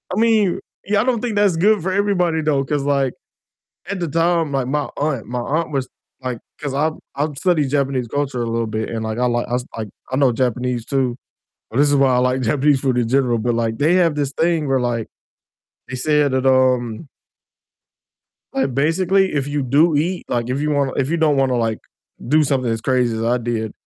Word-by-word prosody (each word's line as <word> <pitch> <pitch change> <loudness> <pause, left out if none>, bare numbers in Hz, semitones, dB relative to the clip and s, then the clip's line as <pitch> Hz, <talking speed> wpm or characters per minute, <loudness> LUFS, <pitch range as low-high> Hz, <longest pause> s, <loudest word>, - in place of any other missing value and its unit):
I - - 0
mean, 220 -5 +3 0.3
yeah, 205 +1 +2
I - - +1
don't 245 -3 0
think 235 -4 -2
that's 205 -4 +3
good 210 +2 +3
for 185 - -2
everybody 185 -5 +1
though, 145 -3 +1
'cause, 145 0 -1
like, 140 -2 +1 0.8
at 200 -2 -3
the 170 - -1
time, 165 0 +1
like, 135 -2 0
my 150 +2 -1
aunt 140 -6 -2
my 125 0 -3
aunt 155 +6 -1
was, 135 -2 -1 0.3
like 125 -2 -3 0.2
'cause 140 -3 -4
I 155 +3 +1 0.3
I 145 +3 0
studied 150 -3 +1
Japanese 135 -4 0
culture 140 -2 -2
a - - -2
little 115 0 -1
bit, 110 0 -3
and 115 -1 -3
like 110 +1 -3
I 125 - +2
li 120 0 0
I 120 - 0 0.2
like 110 -2 -4 0.2
I 130 - -1
know 135 -2 +3
Japanese 125 0 -1
too, 130 -2 -1 0.5
but 120 - -3
this 145 0 +5
is 145 - +3
why 135 -2 +4
I - - +3
like 125 +1 +1
Japanese 140 +3 +2
food 130 -2 0
in 120 -2 0
general, 125 -2 +2
but, 120 +2 0
like, 115 -1 -1
they 155 +5 +3
have 170 -4 +3
this 145 -2 -1
thing 165 0 +1
where, 135 -1 +2
like, 120 -2 -1 0.8
they 130 - -6
said 145 +1 +2
that, 130 0 0
um 130 0 +2 1.5
like, 135 -1 0
basically 185 +7 +2
if 140 -2 -1
you 145 0 -1
do 150 +5 +3
eat, 175 +5 0
like, 120 0 -2
if 130 +2 -1
you 150 0 0
wanna 140 -2 +1
if 135 +1 0
you 170 - 0
don't 155 -3 +2
wanna, 130 -2 +2
like, 115 -2 -1 0.5
do 155 +4 +4
something 130 -4 0
as 115 0 -2
crazy 125 -3 +1
as 110 - -3
I 120 +2 +2
did, 115 -2 -3
135 Hz, 215 wpm, -20 LUFS, 125-155 Hz, 1.5 s, this